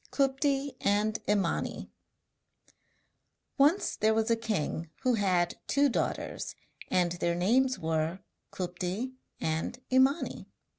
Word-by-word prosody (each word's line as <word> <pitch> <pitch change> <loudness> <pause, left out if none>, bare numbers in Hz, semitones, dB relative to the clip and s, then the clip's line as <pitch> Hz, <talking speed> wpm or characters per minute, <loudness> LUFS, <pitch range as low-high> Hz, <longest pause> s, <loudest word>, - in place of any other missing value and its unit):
KUPTI 275 0 0
AND 210 +2 +1
IMANI 205 -2 0 1.7
Once 300 +8 +4
there 220 +1 +2
was 220 +1 +1
a - - +5
king 195 -7 -2
who 255 - +3
had 185 -5 +1
two 285 0 +3
daughters; - - -2 0.3
and 175 -2 +2
their 170 0 0
names 255 +9 +3
were 160 +2 -1 0.3
Kupti 185 +7 -3 0.3
and 160 +10 -2
Imani. 265 +4 +2
215 Hz, 105 wpm, -30 LUFS, 175-260 Hz, 1.7 s, a